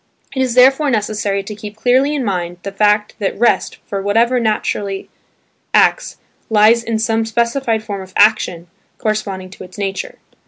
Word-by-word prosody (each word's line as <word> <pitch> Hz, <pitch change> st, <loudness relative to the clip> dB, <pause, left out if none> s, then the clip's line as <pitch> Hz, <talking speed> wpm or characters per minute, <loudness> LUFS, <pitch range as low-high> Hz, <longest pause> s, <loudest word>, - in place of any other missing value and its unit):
It 265 Hz, -, 0 dB
is 255 Hz, -2 st, 0 dB
therefore 270 Hz, +4 st, +5 dB
necessary 210 Hz, -3 st, -1 dB
to 210 Hz, -, -7 dB
keep 210 Hz, 0 st, -9 dB
clearly 260 Hz, +5 st, +2 dB
in 270 Hz, -4 st, -2 dB
mind 175 Hz, -3 st, -2 dB
the 200 Hz, -, -5 dB
fact 210 Hz, +1 st, +2 dB
that 200 Hz, -2 st, -2 dB
rest 235 Hz, +3 st, +1 dB
for 200 Hz, -1 st, -4 dB
whatever 230 Hz, +5 st, +2 dB
naturally 205 Hz, -3 st, -2 dB, 0.7 s
acts, -, -, +2 dB, 0.3 s
lies 220 Hz, +2 st, +4 dB
in 230 Hz, -1 st, -1 dB
some 225 Hz, 0 st, 0 dB
specified 235 Hz, 0 st, -1 dB
form 200 Hz, -3 st, -5 dB
of 190 Hz, 0 st, -12 dB
action, 205 Hz, -5 st, +3 dB, 0.3 s
corresponding 200 Hz, -4 st, -3 dB
to 190 Hz, -, -11 dB
its 185 Hz, +2 st, -13 dB
nature. 205 Hz, -, -4 dB
215 Hz, 160 wpm, -17 LUFS, 200-235 Hz, 0.7 s, therefore